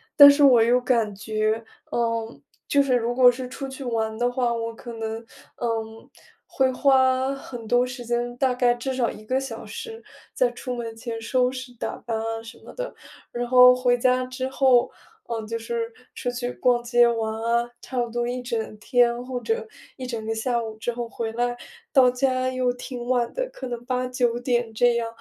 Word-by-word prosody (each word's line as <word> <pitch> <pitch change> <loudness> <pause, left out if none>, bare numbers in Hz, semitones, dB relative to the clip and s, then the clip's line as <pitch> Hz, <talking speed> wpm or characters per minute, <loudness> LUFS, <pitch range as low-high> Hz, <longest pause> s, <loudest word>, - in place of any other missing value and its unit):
但 285 -1 +11
是 285 0 +3
我 250 -4 +7
又 245 +2 +4
感 230 -5 +1
觉， 215 +2 -1 0.3
嗯， 230 -1 -2 0.3
就 285 - +4
是 255 -2 +2
如 240 0 0
果 250 -1 +7
是 250 +1 -6
出 270 +1 -6
去 265 +1 -8
玩 220 -2 -2
的 245 +1 +1
话， 245 -2 0
我 230 0 -3
可 235 0 -9
能， 225 0 -4 0.4
嗯， 225 -1 -3 0.4
会 260 -1 +1
花 260 0 +3
很 240 -4 -9
多 245 +2 +3
时 250 -1 -7
间， 240 +1 -1
大 260 -1 +2
概 245 -1 +3
至 260 +2 -4
少 250 -2 +1
1 215 - -10
个 260 +3 +1
小 255 -4 -6
时 455 -1 -8 0.3
在 - - +2
出 250 -2 -5
门 230 -1 -5
前 225 0 -5
收 250 +2 +1
拾、 255 -1 -8
打 - - -3
扮 230 -2 -4
啊 225 0 -3
什 225 - -11
么 - - -12
的。 - - -5 0.4
然 240 0 -3
后 250 0 +8
回 245 -1 +2
家 255 +1 +2
之 255 +1 -4
后 260 -2 +3 0.4
嗯， 225 -2 -3
就 230 0 -3
是 230 0 -3 0.2
出 245 - -3
去 245 0 -3
逛 245 -1 +2
街 240 0 +4
玩 225 -2 -1
啊， 235 +1 +1
差 255 -2 -4
不 240 -1 0
多 240 +1 -2
一 250 +1 -3
整 230 -3 -3
天， 240 +1 +3
或 250 -1 -3
者 455 0 -2 0.3
一 260 - -9
整 225 -3 -4
个 225 - -1
下 235 +2 0
午， 220 -1 -6
之 240 +2 -2
后 235 0 -4
回 230 -1 -4
来， 240 +1 0 0.4
到 255 -2 +7
家 255 0 0
又 255 -1 0
挺 245 -1 -7
晚 245 -2 +1
的， - - -1
可 260 - -6
能 240 -1 -5
8-9 250 -1 0
点， 240 -2 0
这 240 +1 +3
样。 230 -1 -1
245 Hz, 210 characters per minute, -24 LUFS, 230-255 Hz, 0.4 s, 但